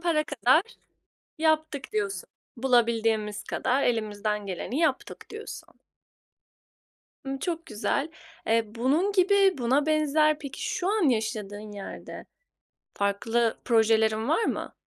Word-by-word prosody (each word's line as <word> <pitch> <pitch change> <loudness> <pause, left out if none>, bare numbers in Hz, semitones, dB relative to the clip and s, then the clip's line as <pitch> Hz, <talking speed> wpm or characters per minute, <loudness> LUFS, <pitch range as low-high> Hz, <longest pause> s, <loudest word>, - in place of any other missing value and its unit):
para 325 -3 +1
kadar 285 +2 +3 0.8
yaptık." 315 -3 0
diyorsun. 200 -4 -2 0.3
"Bulabildiğimiz 225 -4 +1
kadar 260 +2 0
elimizden 210 -2 -1
geleni 195 - -4
yaptık." 300 -6 -1
diyorsun. 435 0 -9 1.5
Imm, 270 0 -3
çok 335 +1 -3
güzel. 245 +7 -1 0.4
Eee, 225 0 +3
bunun 295 - +1
gibi 390 -3 +4
buna 265 +5 +2
benzer, 305 0 +3
peki, 280 -3 -7
şu 360 - -1
an 410 -7 +2
yaşadığın 215 -2 -2
yerde 200 -1 -8 0.7
farklı 225 +3 0
projelerin 220 -1 +3
var 330 +9 +2
mı? - - -3
250 Hz, 110 wpm, -27 LUFS, 220-310 Hz, 1.5 s, gibi